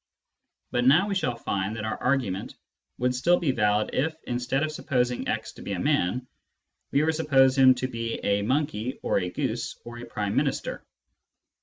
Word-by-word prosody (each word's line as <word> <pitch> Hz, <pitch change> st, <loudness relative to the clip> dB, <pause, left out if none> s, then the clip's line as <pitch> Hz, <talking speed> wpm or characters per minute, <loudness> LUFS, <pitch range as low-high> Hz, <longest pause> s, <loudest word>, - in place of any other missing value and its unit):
But 125 Hz, -, +1 dB
now 155 Hz, +10 st, +5 dB
we 205 Hz, -, -1 dB
shall 130 Hz, -11 st, 0 dB
find 100 Hz, -2 st, -2 dB
that 110 Hz, -1 st, -4 dB
our 110 Hz, -, -3 dB
argu 125 Hz, -5 st, +1 dB
ment 95 Hz, +2 st, -6 dB, 0.4 s
would 125 Hz, +1 st, +1 dB
still 170 Hz, +8 st, +3 dB
be 155 Hz, -6 st, +1 dB
valid 105 Hz, -3 st, +1 dB
if, 155 Hz, +4 st, 0 dB
instead 125 Hz, +3 st, -1 dB
of 155 Hz, -, -1 dB
supposing 125 Hz, -5 st, -1 dB
x -, -, -2 dB
to -, -, -13 dB
be -, -, -4 dB
a -, -, -3 dB
man, 120 Hz, +9 st, +1 dB, 0.6 s
we 140 Hz, -, +2 dB
were 160 Hz, -, +3 dB
to -, -, -6 dB
suppose 135 Hz, -4 st, +4 dB
him 130 Hz, -1 st, +7 dB
to 130 Hz, -, -2 dB
be 115 Hz, -2 st, -3 dB
a 100 Hz, 0 st, +2 dB
monkey 130 Hz, 0 st, -1 dB
or -, -, +2 dB
a 90 Hz, -1 st, -2 dB
goose -, -, -3 dB
or 120 Hz, 0 st, -8 dB
a 120 Hz, -, -7 dB
Prime 105 Hz, -3 st, -3 dB
Minister. -, -, -1 dB
125 Hz, 195 wpm, -26 LUFS, 110-140 Hz, 0.6 s, him